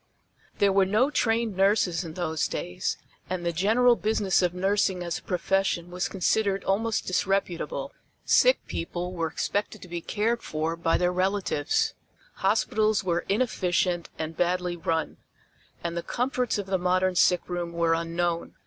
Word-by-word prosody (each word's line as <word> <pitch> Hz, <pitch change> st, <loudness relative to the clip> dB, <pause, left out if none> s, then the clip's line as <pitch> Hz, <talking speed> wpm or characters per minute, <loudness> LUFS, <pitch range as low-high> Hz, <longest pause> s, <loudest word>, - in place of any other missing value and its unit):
There 200 Hz, -1 st, +3 dB
were 195 Hz, -1 st, +4 dB
no 230 Hz, +9 st, +2 dB
trained 225 Hz, -5 st, +1 dB
nurses 190 Hz, -3 st, +2 dB
in 160 Hz, -2 st, -8 dB
those 160 Hz, -4 st, -1 dB
days, 90 Hz, 0 st, -3 dB, 0.3 s
and 180 Hz, -1 st, -3 dB
the 170 Hz, -, 0 dB
general 225 Hz, +8 st, +4 dB
business 210 Hz, -4 st, +1 dB
of 180 Hz, -1 st, +2 dB
nursing 190 Hz, 0 st, 0 dB
as 170 Hz, -1 st, -3 dB
a -, -, -21 dB
profession 180 Hz, -1 st, 0 dB
was 180 Hz, +2 st, -2 dB
considered 195 Hz, +1 st, +1 dB
almost 220 Hz, +3 st, 0 dB
disreputable. 195 Hz, -, -1 dB, 0.3 s
Sick -, -, +4 dB
people 175 Hz, +2 st, -4 dB
were 165 Hz, -2 st, -1 dB
expected 205 Hz, +6 st, -2 dB
to -, -, -10 dB
be 170 Hz, -1 st, -5 dB
cared 225 Hz, +6 st, -1 dB
for 155 Hz, +2 st, -2 dB
by 165 Hz, 0 st, +1 dB
their 180 Hz, 0 st, +1 dB
relatives; 185 Hz, -5 st, 0 dB, 0.4 s
hospitals 215 Hz, -1 st, +2 dB
were 175 Hz, -2 st, -1 dB
inefficient 185 Hz, -6 st, 0 dB
and 160 Hz, 0 st, -4 dB
badly 180 Hz, 0 st, 0 dB
run, 165 Hz, -1 st, -2 dB, 0.7 s
and 170 Hz, 0 st, -3 dB
the 170 Hz, -, -1 dB
comforts 250 Hz, +3 st, -1 dB
of 205 Hz, -, -3 dB
the 190 Hz, -1 st, -1 dB
modern 185 Hz, +1 st, +2 dB
sickroom 175 Hz, -1 st, +1 dB
were 170 Hz, -1 st, +1 dB
unknown. 170 Hz, +1 st, -2 dB
185 Hz, 150 wpm, -26 LUFS, 170-205 Hz, 0.7 s, were